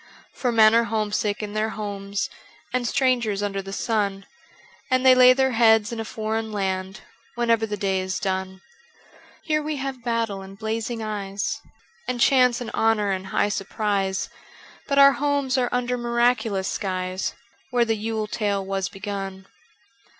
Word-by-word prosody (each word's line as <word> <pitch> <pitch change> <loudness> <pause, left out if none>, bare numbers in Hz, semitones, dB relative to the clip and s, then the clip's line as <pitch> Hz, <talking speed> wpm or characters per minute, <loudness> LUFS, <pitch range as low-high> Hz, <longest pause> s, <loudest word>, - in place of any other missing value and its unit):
For 250 - -1
men 220 -1 +6
are 230 0 +4
homesick 210 -1 -1
in 205 -1 -5
their 215 +1 0
homes, 200 -1 -3 0.5
And 250 -1 0
strangers 235 -6 +1
under 195 -1 -2
the 195 0 -9
sun, 200 -2 -1 0.6
And 255 0 +2
they 260 - +9
lay 255 0 +8
their 265 0 +2
heads 225 -1 +4
in 230 - -5
a 225 - -3
foreign 220 0 -3
land 190 0 -3 0.3
Whenever 230 -2 +2
the 210 -1 -3
day 195 -1 0
is 185 0 -3
done. 190 -1 -3 0.8
Here 305 -1 +1
we 305 0 -3
have 270 -3 -5
battle 230 -4 -1
and 195 0 -11
blazing 225 +2 -3
eyes, 200 -2 -3 0.5
And 250 -1 -2
chance 250 -2 +4
and 240 -2 -5
honour 215 -2 +2
and 190 0 -3
high 205 - +1
surprise, 195 -1 -1 0.6
But 280 - 0
our 280 0 +9
homes 280 -2 0
are 245 -1 +1
under 250 0 -1
miraculous 235 -5 +1
skies 185 -1 -3 0.3
Where 245 -2 +2
the 225 - +1
Yule 220 0 -2
tale 205 -2 -1
was 195 -1 -2
begun. 195 -1 -6
215 Hz, 155 wpm, -24 LUFS, 195-240 Hz, 0.8 s, they